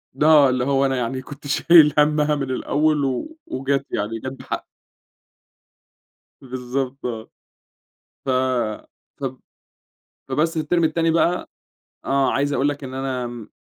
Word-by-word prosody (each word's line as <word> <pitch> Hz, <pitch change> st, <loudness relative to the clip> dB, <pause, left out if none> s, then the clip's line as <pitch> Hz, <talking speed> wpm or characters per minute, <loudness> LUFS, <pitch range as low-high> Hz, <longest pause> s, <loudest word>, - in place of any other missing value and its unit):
ل 150 Hz, -, 0 dB
آه 150 Hz, -3 st, +7 dB
اللي 125 Hz, -1 st, 0 dB
هو 140 Hz, 0 st, +2 dB
أنا 135 Hz, -1 st, +1 dB
يعني 125 Hz, +2 st, -2 dB
كنت 145 Hz, +2 st, -10 dB
شايل 155 Hz, 0 st, +6 dB
همّها 150 Hz, 0 st, +3 dB
من 135 Hz, -2 st, -3 dB
الأول 150 Hz, +2 st, +1 dB
و 220 Hz, -, -3 dB
وجت 135 Hz, +1 st, -1 dB
يعني 105 Hz, +2 st, -2 dB
جت 130 Hz, -, -5 dB
بحق. 135 Hz, -, -6 dB, 1.8 s
بالضبط 130 Hz, +1 st, -4 dB
آه. 115 Hz, -2 st, -5 dB, 1.0 s
ف -, -, -3 dB, 0.9 s
فب 130 Hz, -2 st, -4 dB, 0.9 s
فبس 155 Hz, +5 st, 0 dB
الترم 165 Hz, +2 st, +1 dB
التاني 165 Hz, +1 st, +2 dB
بقى 170 Hz, +2 st, +1 dB, 0.6 s
آه 135 Hz, -1 st, +2 dB
عايز 145 Hz, +2 st, 0 dB
أقول 140 Hz, 0 st, +2 dB
لك 145 Hz, -1 st, -4 dB
إن 130 Hz, 0 st, -7 dB
أنا 125 Hz, -4 st, -4 dB
140 Hz, 130 wpm, -22 LUFS, 130-150 Hz, 1.8 s, آه